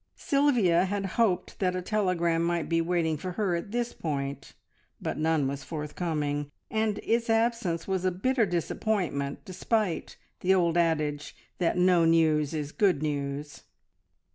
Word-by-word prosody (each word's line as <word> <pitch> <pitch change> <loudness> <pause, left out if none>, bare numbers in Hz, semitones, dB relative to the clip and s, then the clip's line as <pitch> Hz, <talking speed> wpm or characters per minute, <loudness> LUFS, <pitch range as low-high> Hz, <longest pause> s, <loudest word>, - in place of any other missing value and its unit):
Sylvia 235 -12 +3
had 200 +1 -2
hoped 195 -2 0
that 185 -2 +1
a 185 - -2
telegram 180 -5 +1
might 170 -2 0
be 165 +1 +2
waiting 165 -2 0
for 180 +4 -5
her 195 -3 0
at 170 +4 -4
this 240 +2 -2
point, 140 -3 -4 0.5
but - - -3
none 155 -3 +2
was 140 +1 -4
forthcoming, 150 -2 -3 0.2
and 220 -1 0
its 230 +1 0
absence 225 -7 +1
was 190 -2 -1
a 185 - +3
bitter 225 +5 +1
disappointment 175 -5 -2
despite 190 -1 -1 0.2
the 190 +1 +3
old 170 -3 +2
adage 155 -3 0 0.2
that 175 0 +1
no 180 -1 +4
news 160 -3 +3
is 150 -2 -3
good 185 -7 +2
news. 145 0 -3
175 Hz, 145 wpm, -28 LUFS, 155-195 Hz, 0.5 s, no